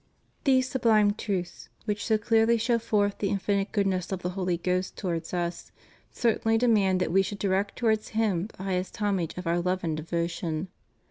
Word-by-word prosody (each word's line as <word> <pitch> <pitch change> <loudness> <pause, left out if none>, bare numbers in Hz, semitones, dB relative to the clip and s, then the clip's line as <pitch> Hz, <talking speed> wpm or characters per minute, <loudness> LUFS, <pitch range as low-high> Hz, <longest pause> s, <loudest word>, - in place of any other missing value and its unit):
These 260 -2 +4
sublime 220 -5 +3
truths, 190 -5 -4 0.2
which 210 -1 -2
so 220 - +2
clearly 225 +2 +3
show 230 +1 +1
forth 205 -2 0
the 200 - 0
infinite 200 0 0
goodness 195 -3 0
of 185 -2 -3
the 180 - -1
Holy 180 -2 -1
Ghost 180 +1 -1
towards 170 -4 -3
us, 175 -1 -3 0.4
cer 235 -2 +1
tainly 225 0 +2
demand 210 -6 +3
that 180 - 0
we 195 +2 +5
should 195 +2 -4
direct 200 0 0
towards 220 -3 +1
Him 205 -5 +1
the 185 - -7
highest 185 -1 -2
homage 195 -6 -1
of 180 - -5
our 170 +1 +1
love 185 +1 -1
and 160 -2 -1
devotion. 170 +1 -3
195 Hz, 185 wpm, -27 LUFS, 180-215 Hz, 0.4 s, we